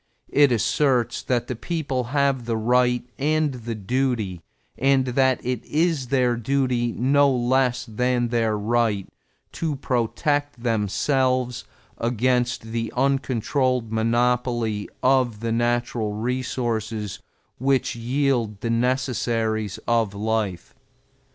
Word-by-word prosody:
It 145 -2 +5
asserts 125 +2 +1
that 120 -2 0
the 125 - -4
people 135 -2 -2
have 140 -1 +1
the 115 -1 -1
right 125 +2 +2
and 155 0 +1
the 120 -2 -5
duty, 110 -4 -1 0.3
and 135 -1 +3
that 130 0 +2
it 125 -2 -2
is 155 -4 0
their 125 -2 +2
duty 125 0 0
no 140 +3 +3
less 125 0 +1
than 120 +1 0
their 115 -2 +1
right, 110 -2 0 0.4
to 160 -3 -2
protect 135 +2 -1
themselves 125 +3 0 0.3
against 120 +1 +1
the 115 0 -2
uncontrolled 130 -2 0
monopoly 120 -1 0
of 125 -4 +3
the 115 +1 -2
natural 120 -2 0
resources 115 -3 -2 0.4
which 135 -1 +1
yield 120 -3 0
the 115 - -1
necessaries 115 -4 0
of 115 -4 +1
life. 105 -4 -2
120 Hz, 110 wpm, -23 LUFS, 115-130 Hz, 0.4 s, It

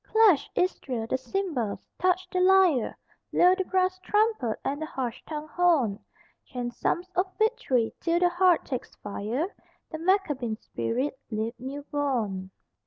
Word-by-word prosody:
Clash, 435 -9 +4
Israel, 260 -10 -1
the 230 - -1
cymbals, 260 - -2 0.2
touch 370 +1 +2
the 365 - 0
lyre, 365 -8 +4 0.3
Blow 360 +1 +6
the 380 0 0
brass 370 0 +1
trumpet 415 - +1
and 285 +2 -2
the - - -1
harsh 250 -6 -4
tongued 310 0 -6
horn; 305 - +2 0.4
Chant 245 -1 -5
psalms 360 +8 -1
of 370 +1 +1
victory 270 - +1
till 335 0 +1
the 355 0 +4
heart 350 -1 +3
takes 255 -3 -5
fire, 230 - -3 0.4
The 315 - -5
Maccabean 305 - +1
spirit 260 +5 -3
leap 220 0 -2
new 275 +3 -6
born. 235 -11 -2
305 Hz, 145 wpm, -27 LUFS, 245-370 Hz, 0.4 s, Blow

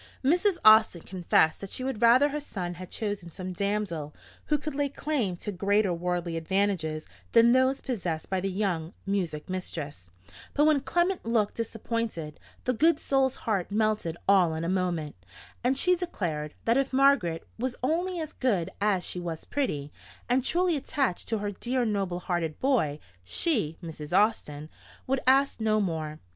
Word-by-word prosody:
Mrs. 350 +7 +3
Austin 215 -5 +7
confessed 175 -3 +2
that 195 - -6
she 255 - -2
would 260 -4 -3
rather 250 +5 +6
her 295 +1 -3
son 180 -10 -4
had 180 +1 -9
chosen 205 -5 -4
some 185 +2 -6
damsel 190 -6 -2 0.3
who 300 - +2
could 295 +1 -5
lay 285 0 0
claim 270 -10 -1
to 210 - -5
greater 200 0 +2
worldly 175 -1 -2
advantages 165 -3 -1 0.3
than 235 0 +7
those 260 +2 +3
possessed 180 -10 -3
by 190 - -1
the 195 +1 -2
young 180 -4 -2
music 180 -7 -2
mistress; 150 - -5 0.5
but 295 - +4
when 305 -2 +4
Clement 350 +6 0
looked 225 -3 +1
disappointed, 225 -8 -4 0.2
the 255 - +1
good 320 +6 +3
soul's 270 -3 +1
heart 200 -6 0
melted 210 -5 0
all 185 -5 +4
in 160 - -3
a - - -1
moment, 175 -5 -1 0.5
and 260 +2 +2
she 360 +5 +4
declared, 170 - -3
that 230 +2 +3
if 275 0 +1
Margaret 260 -12 +3
was 250 +1 -1
only 345 +6 0
as 315 -1 -5
good 200 -11 0
as 200 -4 +2
she 180 - -3
was 170 -2 -5
pretty, 150 - -2 0.4
and 250 +1 +2
truly 350 +4 +2
attached 270 -7 -1
to 225 - 0
her 205 0 -3
dear 245 +5 -1
noble 195 -5 -1
hearted 170 -4 -2
boy, 230 - +1 0.3
she 190 - 0
(Mrs. 160 +1 -2
Austin) 155 -9 +1 0.4
would 270 +1 0
ask 270 -2 +4
no 215 -1 +2
more. 160 -6 -2
205 Hz, 165 wpm, -28 LUFS, 170-260 Hz, 0.5 s, Austin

